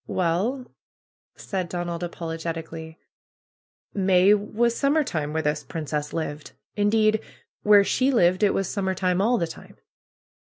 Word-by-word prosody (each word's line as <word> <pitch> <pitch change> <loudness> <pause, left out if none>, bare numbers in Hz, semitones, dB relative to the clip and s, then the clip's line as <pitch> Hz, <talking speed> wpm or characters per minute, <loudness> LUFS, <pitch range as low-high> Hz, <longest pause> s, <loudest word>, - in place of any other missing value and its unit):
"Well," 190 +10 0 0.7
said 185 -3 -4
Donald, 175 -1 -4
apologetically, 165 -1 -5 1.0
"May 190 0 +4
was 220 +3 0
sum 275 +2 +2
mer 315 -1 +3
time 155 - -3
where 160 +1 -1
this 150 +1 -1
princess 150 -2 -4
lived. 155 -2 -5 0.2
Indeed, 215 +1 +3 0.4
where 205 -1 +6
she 255 +6 +1
lived 185 -7 +3
it 205 - +3
was 195 - 0
summer 190 -1 -2
time 185 0 +1
all 240 +4 +3
the 170 - 0
time 160 - -12
185 Hz, 135 wpm, -24 LUFS, 165-210 Hz, 1.0 s, where